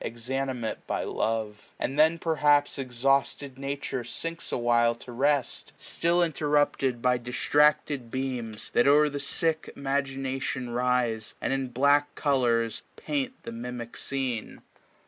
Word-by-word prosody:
Exanimate 125 Hz, 0 st, -3 dB
by -, -, -1 dB
love: 110 Hz, -2 st, -2 dB
and 140 Hz, +2 st, -2 dB
then 160 Hz, +2 st, +5 dB
perhaps 150 Hz, -3 st, +2 dB
Exhausted 135 Hz, +1 st, 0 dB
Nature 140 Hz, -2 st, -3 dB
sinks 165 Hz, +7 st, -5 dB
a -, -, 0 dB
while 120 Hz, -1 st, +3 dB
to 120 Hz, +1 st, -11 dB
rest; 140 Hz, +2 st, 0 dB
1050 -, -, -8 dB
Still 170 Hz, +1 st, +3 dB
interrupted 145 Hz, -5 st, +1 dB
by 125 Hz, -1 st, +3 dB
distracted 140 Hz, +1 st, +2 dB
dreams. 125 Hz, -4 st, -4 dB
That 120 Hz, -, +3 dB
o'er 150 Hz, +1 st, +6 dB
the 145 Hz, 0 st, -4 dB
sick 160 Hz, +3 st, 0 dB
imagination 135 Hz, -2 st, -2 dB
rise. 120 Hz, -3 st, 0 dB
And -, -, -1 dB
in 135 Hz, -1 st, -1 dB
black 140 Hz, +4 st, +2 dB
colours 120 Hz, -6 st, +1 dB
paint 275 Hz, -3 st, -2 dB
the -, -, -6 dB
mimic 120 Hz, 0 st, -6 dB
scene. 130 Hz, -5 st, -3 dB
135 Hz, 130 wpm, -27 LUFS, 120-145 Hz, -, o'er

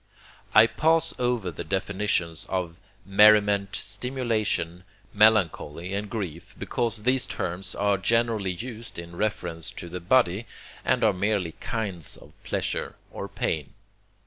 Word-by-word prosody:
I 110 Hz, +2 st, +10 dB
pass 160 Hz, +7 st, +2 dB
over 120 Hz, -7 st, 0 dB
the 85 Hz, -, -6 dB
definitions 95 Hz, -2 st, -1 dB
of 90 Hz, -3 st, -2 dB, 0.3 s
merriment, 100 Hz, 0 st, +5 dB
stimulation, 110 Hz, -6 st, -1 dB, 0.3 s
melancholy, 95 Hz, -5 st, +3 dB
and 100 Hz, +1 st, -2 dB
grief, 90 Hz, -8 st, -5 dB
because 115 Hz, -3 st, -2 dB
these 130 Hz, +1 st, +2 dB
terms 90 Hz, +2 st, -4 dB
are 100 Hz, -1 st, +1 dB
generally 115 Hz, -2 st, +1 dB
used 115 Hz, +3 st, -8 dB
in 85 Hz, 0 st, -8 dB
reference 90 Hz, -6 st, -1 dB
to 85 Hz, -, -8 dB
the 90 Hz, +2 st, -5 dB
body, 100 Hz, +2 st, +2 dB, 0.4 s
and -, -, +2 dB
are 110 Hz, -2 st, +5 dB
merely 100 Hz, -2 st, 0 dB
kinds 95 Hz, -4 st, -4 dB
of -, -, -15 dB
pleasure -, -, -2 dB, 0.2 s
or 100 Hz, -, -5 dB
pain. 90 Hz, -6 st, -3 dB
100 Hz, 125 wpm, -26 LUFS, 90-110 Hz, 0.4 s, I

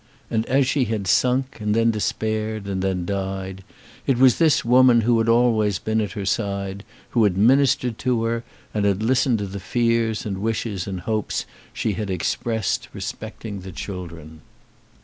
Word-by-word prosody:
And 110 Hz, -1 st, 0 dB
as 135 Hz, +1 st, +3 dB
she 130 Hz, 0 st, +1 dB
had 110 Hz, -3 st, -2 dB
sunk, 130 Hz, +7 st, +1 dB
and 105 Hz, 0 st, 0 dB
then 115 Hz, 0 st, +3 dB
despaired, 110 Hz, 0 st, -2 dB
and 95 Hz, -1 st, -2 dB
then 95 Hz, -2 st, -1 dB
died, 95 Hz, 0 st, -4 dB, 0.4 s
it 135 Hz, -, +3 dB
was 130 Hz, -1 st, +5 dB
this 160 Hz, -7 st, +3 dB
woman 125 Hz, 0 st, +6 dB
who 120 Hz, +2 st, +3 dB
had 115 Hz, 0 st, +1 dB
always 115 Hz, -4 st, +3 dB
been 110 Hz, +3 st, -1 dB
at 105 Hz, -, -3 dB
her 100 Hz, -4 st, -4 dB
side, 100 Hz, -1 st, -2 dB, 0.3 s
who 115 Hz, -, +3 dB
had 95 Hz, -3 st, +2 dB
ministered 125 Hz, +1 st, +3 dB
to 125 Hz, -3 st, 0 dB
her, 115 Hz, +1 st, -1 dB, 0.3 s
and 105 Hz, -1 st, 0 dB
had 100 Hz, +1 st, +1 dB
listened 125 Hz, 0 st, +2 dB
to 100 Hz, -, -3 dB
the 100 Hz, +1 st, -6 dB
fears 115 Hz, +1 st, 0 dB
and 100 Hz, -3 st, -3 dB
the -, -, -7 dB
wishes 105 Hz, -3 st, -2 dB
and 95 Hz, -2 st, -4 dB
hopes 110 Hz, +2 st, -2 dB, 0.3 s
she 110 Hz, -, -1 dB
had 105 Hz, 0 st, -4 dB
expressed 110 Hz, +3 st, -1 dB
respecting 105 Hz, -3 st, -6 dB
the 95 Hz, 0 st, -9 dB
children. 85 Hz, -4 st, -8 dB
110 Hz, 175 wpm, -23 LUFS, 95-115 Hz, 0.4 s, woman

